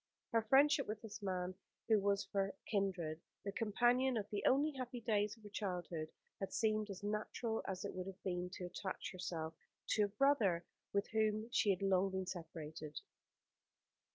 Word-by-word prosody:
Her 230 -1 +4
friendship 275 +6 +5
with 215 0 -3
this 220 0 -7
man, 185 -2 -1 0.3
who 220 -2 +6
was 200 0 +2
of - - -31
her 195 -1 +1 0.2
kindred, 180 -6 0 0.2
the 200 - -1
companion 240 +5 +3
of 205 -2 -2
the 205 - -1
only 285 +4 +4
happy 255 -3 -4
days 210 -2 +1
of 220 - -20
her 205 - -9
childhood, 180 -6 -3 0.3
had 195 - -3
seemed 215 -1 +1
as 195 0 -6
natural 215 +2 -1
as 190 0 -3
it 200 - -3
would 185 0 -4
have 195 0 -8
been 180 -1 -1
to 180 - -4
attach 185 +1 -4
herself 170 -3 -3 0.4
to 210 -1 +4
a - - -1
brother 205 -7 +3 0.3
from 200 - +3
whom 220 0 +2
she 210 - +3
had 195 0 +2
long 195 0 +4
been 190 0 -2
separated. 160 -4 -6
200 Hz, 180 wpm, -38 LUFS, 185-220 Hz, 0.4 s, who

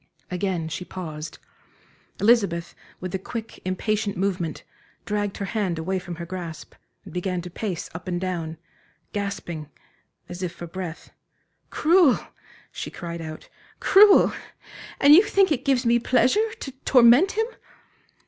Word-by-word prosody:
Again 180 -3 -1
she 160 +3 -5
paused. 155 -4 -7 0.8
Elizabeth, 200 -6 +2 0.3
with 185 -1 -6
a 190 - -1
quick, 225 +3 -7
impatient 205 +2 -1
movement, 180 -4 -2 0.4
dragged 205 -1 -2
her 200 - -3
hand 195 -4 -1
away 185 +4 -1
from 175 -1 -7
her 170 +1 -6
grasp, 175 -2 -7 0.3
and - - -11
began 180 0 -2
to 180 - -8
pace 190 -2 -4
up 165 +3 -8
and 175 -1 -1
down, 170 -3 -3 0.6
gasping 200 -7 -4 0.6
as 175 +1 -8
if 180 -2 -3
for 175 - -7
breath. 175 -1 -7 0.6
"Cruel," 330 -3 +4 0.5
she - - -6
cried 170 -1 -6
out, 155 -1 -8 0.3
"cruel! 405 0 +7 0.7
And 285 +1 +8
you 340 - +10
think 395 -3 +3
it 260 -3 0
gives 265 -2 +2
me 235 +1 +4
pleasure 255 - +3
to 270 - -5
torment 250 - +6
him!" 445 +1 +1
190 Hz, 140 wpm, -24 LUFS, 175-235 Hz, 0.8 s, you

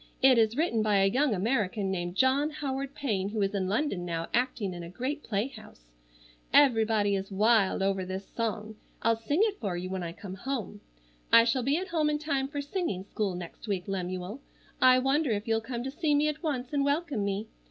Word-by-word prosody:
It 260 -2 +6
is 225 +2 +2
written 300 -9 +1
by 215 -1 +2
a 195 - +4
young 265 -2 +2
American 205 -1 0
named 175 -1 -3
John 265 +6 +3
Howard 275 -2 -4
Payne 205 -9 -1
who 215 0 -2
is 195 +1 -1
in 190 -2 -1
London 205 -2 -1
now 165 -1 -3
acting 240 -6 0
in 175 - -7
a 170 - -7
great 260 - -3
playhouse. 215 - -5 0.6
Everybody 225 -6 +4
is 195 0 -3
wild 205 -1 +3
over 195 -1 +1
this 190 +1 -5
song. 220 -1 -4 0.3
I'll 230 0 +4
sing 285 - 0
it 425 -2 0
for 195 -5 -2
you 185 +1 -5
when 190 -1 -3
I 170 -1 -4
come 190 0 -8
home. 220 -1 -4 0.5
"I 230 - +9
shall 240 +2 +1
be 275 +5 +1
at 375 +2 -4
home 315 -3 +1
in 300 - +1
time 285 -3 -1
for 285 0 -4
singing 285 - -2
school 200 -1 -2
next 175 +5 -8
week, 190 -3 -2
Lemuel. 185 +4 -4 0.4
I 255 0 +7
wonder 270 +3 +2
if 210 -1 -1
you'll 225 0 +1
come 240 +1 -5
to 265 - -4
see 300 0 +1
me 295 +1 +3
at 305 0 -3
once 270 -5 -3
and 280 -1 +2
welcome 285 -5 0
me. 200 +2 -2
225 Hz, 210 wpm, -29 LUFS, 195-275 Hz, 0.6 s, I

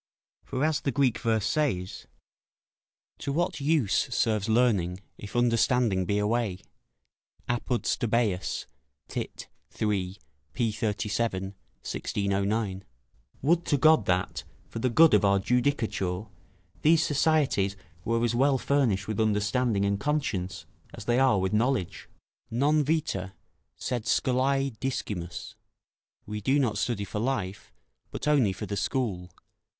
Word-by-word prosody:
For 130 +3 -1
as 155 -1 +1
the 140 - 0
Greek 130 -3 +2
verse 110 -3 +1
says 125 - -1 1.1
["To 140 - -3
what 160 0 -1
use 140 -8 +2 0.2
serves 110 -4 +1
learning, 105 -7 +2 0.2
if 105 - -9
understanding 115 -4 +2
be 100 +3 0
away." 105 -2 0 0.9
Apud 120 0 -1
Stobaeus, 110 -5 0 0.4
tit. - - -5 0.3
iii., 95 -3 -1 0.4
p. 115 +3 0
37 105 -1 -1 0.4
(1609).] 100 0 -1 0.6
Would 170 +4 +3
to 145 - +2
God 155 -6 +5
that, 90 0 0 0.2
for - - -6
the 125 - +1
good 160 +6 +6
of 105 -2 +5
our 100 0 +4
judicature, 110 -5 0 0.6
these 160 +1 +4
societies 140 -10 +2 0.3
were 115 +1 0
as 120 -1 +1
well 135 +3 +3
furnished 120 -9 +1
with 110 -1 -3
understanding 105 0 +1
and 100 0 0
conscience 100 -10 -2 0.3
as - - -9
they 120 +2 +2
are 130 -6 +4
with 95 +1 -1
knowledge. 115 -4 0 0.4
"Non 145 +6 +2
vita, 145 - -1 0.4
sed 120 -3 -3
scolae 135 +2 +1
discimus." 105 -10 -4 0.7
["We 105 0 -5
do 135 +7 +2
not 115 -8 +1
study 110 -3 -1
for 105 - -4
life, 100 -5 -3 0.4
but - - -5
only 140 -9 +4
for - - -5
the 100 - -4
school." 100 -3 -2
115 Hz, 125 wpm, -27 LUFS, 100-135 Hz, 1.1 s, good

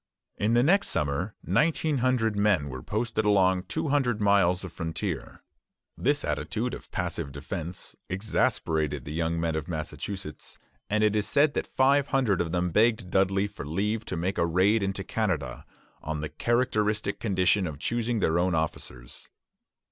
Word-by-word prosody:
In 110 +3 +1
the 120 - +5
next 195 +7 +3
summer 80 +7 -1
nineteen 155 -2 +1
hundred 120 -4 +1
men 100 -8 +2
were 65 -1 -6
posted 110 - -1
along 95 -3 +3
two 160 -1 -2
hundred 130 -6 +1
miles 100 -3 +3
of 90 - -7
frontier. 80 - -4 0.5
This - - +1
attitude - - -2
of - - -8
passive 70 - -3
defence 80 +5 -5
exasperated 80 - 0
the 75 - -5
young 80 +1 -1
men 80 -1 0
of 80 +1 -3
Massachusetts, 80 0 -6 0.3
and 105 +1 +2
it 105 0 +3
is 105 -1 +1
said 145 +1 +3
that - - -2
five 140 +1 +3
hundred 125 - +2
of 85 -2 -2
them 90 0 0
begged 110 -1 +2
Dudley 95 +1 +2
for 100 - -9
leave 105 +9 -1
to - - -4
make 90 +4 -1
a - - +3
raid 95 +6 +3
into 95 0 -2
Canada, 80 - -2 0.3
on 80 0 -3
the 75 - -3
characteristic 105 +1 0
condition 95 -2 +2
of 75 -3 -6
choosing 115 +5 -1
their 85 -1 +2
own 90 0 +1
officers. 65 -6 -5
95 Hz, 165 wpm, -27 LUFS, 80-110 Hz, 0.5 s, the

